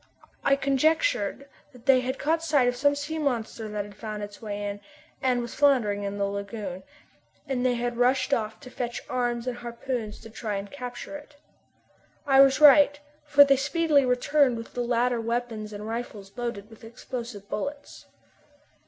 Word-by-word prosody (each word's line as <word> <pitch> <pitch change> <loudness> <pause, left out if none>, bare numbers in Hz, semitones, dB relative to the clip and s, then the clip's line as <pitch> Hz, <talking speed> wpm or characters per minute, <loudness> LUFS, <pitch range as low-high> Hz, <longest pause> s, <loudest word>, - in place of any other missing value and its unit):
I 275 - +4
conjectured 280 - +1 0.3
that 250 -1 -17
they 270 -2 +6
had 260 +1 -3
caught 320 +3 0
sight 295 -6 +3
of 245 - +1
some 285 +3 +2
sea 295 +3 -4
monster 230 -6 -2
that 210 -1 -3
had 205 - -12
found 215 -1 -6
its 205 0 -9
way 205 -2 -4
in, 205 0 -5 0.4
and 250 -2 +1
was 235 - -7
floundering 245 -8 +3
in 200 0 -4
the 200 - +1
lagoon, 200 -2 -5 0.7
and 255 -2 -1
that 255 - +3
they 245 - +1
had 240 0 -2
rushed 255 +3 +2
off 220 -3 -1
to 250 -3 -11
fetch 240 -1 -4
arms 240 -1 -1
and 250 -1 -3
harpoons 235 -2 -5
to 225 - -12
try 220 -2 -4
and 200 0 -5
capture 250 +1 -7
it. 295 0 -16 0.9
I 270 -2 +6
was 270 0 +5
right, 290 -1 +7 0.3
for 285 -1 +7
they 275 -1 +4
speedily 295 +1 +2
returned 255 +1 +2
with 230 - -9
the 245 - -2
latter 240 0 +1
weapons 230 -2 -3
and 210 +1 -7
rifles 220 -4 -6
loaded 235 -3 -5
with 225 - -15
explosive 230 -2 -7
bullets. 285 +8 -6
245 Hz, 180 wpm, -26 LUFS, 220-275 Hz, 0.9 s, right